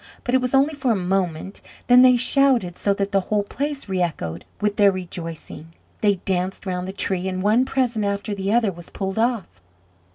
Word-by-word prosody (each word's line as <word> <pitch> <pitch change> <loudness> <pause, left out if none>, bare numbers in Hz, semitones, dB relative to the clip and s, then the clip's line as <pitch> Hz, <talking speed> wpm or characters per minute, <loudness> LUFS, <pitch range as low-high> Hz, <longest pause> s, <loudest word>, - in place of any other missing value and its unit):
But 245 - -2
it 260 - +4
was 250 +1 0
only 280 +3 +3
for 275 -3 -2
a - - +2
moment; 185 -1 -2 0.2
then 245 0 +7
they 255 -1 +7
shouted 245 -7 +2
so 200 - 0
that 200 0 -2
the 195 - +3
whole 205 +2 0
place 280 +6 -4
reechoed 170 - -3
with 210 0 -1
their 200 -1 +6
rejoicing; 165 -3 -7 0.2
they 205 -2 +3
danced 185 +1 -3
round 180 -1 -3
the - - -4
tree, 190 -1 -2
and 185 0 -3
one 220 +5 +3
present 245 -5 0
after 200 +1 -2
the 195 0 -2
other 225 -3 +2
was 175 -1 -12
pulled 195 +1 -4
off. 225 - -1
200 Hz, 195 wpm, -22 LUFS, 185-240 Hz, 0.2 s, then